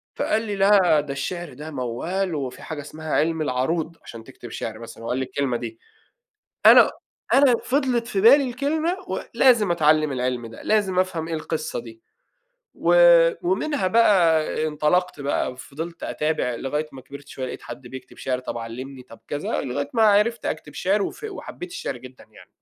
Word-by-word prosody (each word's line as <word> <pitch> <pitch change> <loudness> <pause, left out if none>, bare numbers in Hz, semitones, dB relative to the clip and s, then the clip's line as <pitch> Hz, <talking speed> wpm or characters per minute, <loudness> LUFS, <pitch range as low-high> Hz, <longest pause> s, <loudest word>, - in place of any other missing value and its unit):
فقال 220 - 0
لي: 210 -2 -4
"لا، 195 -6 +4
ده 145 -1 -6
الشِعر 175 +1 -5
ده 150 +4 -8
موّال، 155 +9 -2
وفي 130 -3 -5
حاجة 155 -2 -6
اسمها 155 +1 -7
عِلم 160 +1 +1
العَروض 155 +5 -1
عشان 115 -1 -10
تكتب 120 - -12
شعر 110 0 -6
مثلًا." 115 0 -10
هو 115 - -5
قال 125 - 0
لي 130 - 0
الكلمة 130 -2 -1
دي. 115 -1 -7 0.9
أنا - - +8 0.4
أنا 270 -3 +6
فضلت 255 -4 0
في 195 -5 -1
بالي 265 +4 +6
الكلمة 310 +8 -1
ولازم 230 -8 +2
اتعلّم 155 -2 +3
العِلم 125 -2 -2
ده، 115 - -12
لازم 200 -4 +1
افهم 180 -4 -1
إيه 165 - -4
القصة 155 -2 -3
دي، 115 -1 -12 0.7
و - - +1 0.5
ومنها 310 - 0
بقى 185 -6 +4 0.2
انطَلَقت 155 +2 0
بقى، 140 -2 -1
وفضلت 160 +6 -8
أتابع 150 -5 -1
لغاية 150 +5 -3
ما 135 - -10
كبرت 140 +2 -12
شوية، 130 -1 -5
لقيت - - -7
حد 130 - -9
بيكتب 130 +1 -10
شِعر 130 -1 -2
طب 125 -1 -5
علّمني، 125 +4 -7
طب 120 -2 -16
كذا، 145 0 -2
لغاية 140 +2 -3
ما 225 - +3
عرفت 215 +2 +3
أكتب 150 -1 -5
شِعر، 200 +3 +1
وف 430 - -5
وحبّيت 380 -3 -7
الشعر 330 - -5
جدًا 130 +1 -13
يعني. - - -18
155 Hz, 170 wpm, -23 LUFS, 130-200 Hz, 0.9 s, أنا